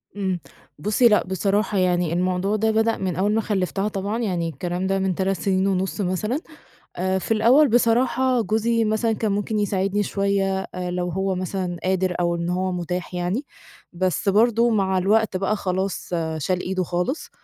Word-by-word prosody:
إمم 190 -3 -1 0.4
بُصّي، 210 +7 +3
لأ 210 -2 +4
بصراحة 200 +3 0
يعني 180 -3 +1
الموضوع 185 +3 0
ده 220 +1 +1
بدأ 220 +1 +2
من 185 -4 -2
أوّل 200 +3 +1
ما 225 - +2
خلفّتها 195 -1 -1
طبعًا، 205 +2 -3
يعني 180 -7 -1
الكلام 180 +2 -3
ده 195 0 +1
من 190 -2 0
3 195 0 0
سنين 190 +2 +1
ونُص 190 +2 -1
مثلًا. 205 - -1 0.6
آآ 190 +1 0
في 205 - -6
الأوّل 250 +7 +5
بصراحة، 245 +2 +2
جوزي 225 +1 +1
مثلًا 220 +1 +1
كان 215 -1 -1
ممكن 205 +1 -1
يساعدني 200 0 0
شويّة، 195 -1 0 0.2
آآ 180 -1 -3
لو 180 0 -2
هو 190 +2 -1
مثلًا 185 -1 -3
قادر، 185 -1 0
أو 170 -1 +1
إن 170 0 -3
هو 185 +1 -1
متاح 180 0 -4
يعني، 180 +10 -2 0.5
بس 185 0 0
برضه 230 +3 +4
مع 195 -4 +1
الوقت 205 +1 +2
بقى 195 +3 0
خلاص 190 -1 -2 0.3
شال 180 +4 -1
إيده 185 0 -1
خالص. 180 - -2
195 Hz, 170 wpm, -23 LUFS, 180-215 Hz, 0.6 s, الأوّل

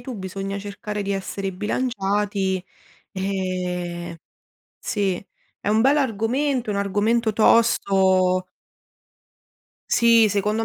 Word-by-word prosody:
tu, 245 0 -7
bisogna 195 +1 -5
cercare 205 +1 -5
di 200 0 -2
essere 195 0 -4
bilanciati. 200 -3 -1 0.5
E, 180 -3 -3 0.6
sì. 195 -3 -2 0.4
È - - -2
un 220 +1 +3
bell'argomento, 260 -1 +1
un 200 - -1
argomento 215 +3 +1
tosto. 190 -5 +3 1.5
Sì, 230 -2 +5
secondo 210 +3 0
200 Hz, 90 wpm, -23 LUFS, 190-225 Hz, 1.5 s, Sì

